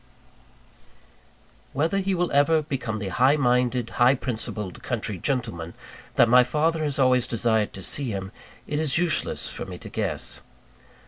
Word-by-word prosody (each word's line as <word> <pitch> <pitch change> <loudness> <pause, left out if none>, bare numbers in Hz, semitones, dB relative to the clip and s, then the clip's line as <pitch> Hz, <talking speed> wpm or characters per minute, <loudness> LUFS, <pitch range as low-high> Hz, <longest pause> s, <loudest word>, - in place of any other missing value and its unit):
Whether 160 +8 0
he 195 0 0
will 175 0 -1
ever 150 +3 +3
become 130 -7 -3
the 100 -2 -4
high 130 +10 +3
minded, 125 -3 +1
high 125 +3 +6
principled 110 -7 -3
country 105 -5 -3
gentleman, 100 - -3 0.4
that 120 - +5
my 125 +2 +6
father 155 +5 0
has 145 -2 0
always 130 -2 +3
desired 110 -2 +1
to 95 - -7
see 140 - +1
him, 95 -2 -5 0.3
it 150 - -2
is 155 -4 +2
useless 175 -2 0
for - - -6
me - - -7
to - - -10
guess. - - -3
125 Hz, 150 wpm, -25 LUFS, 110-150 Hz, 0.4 s, high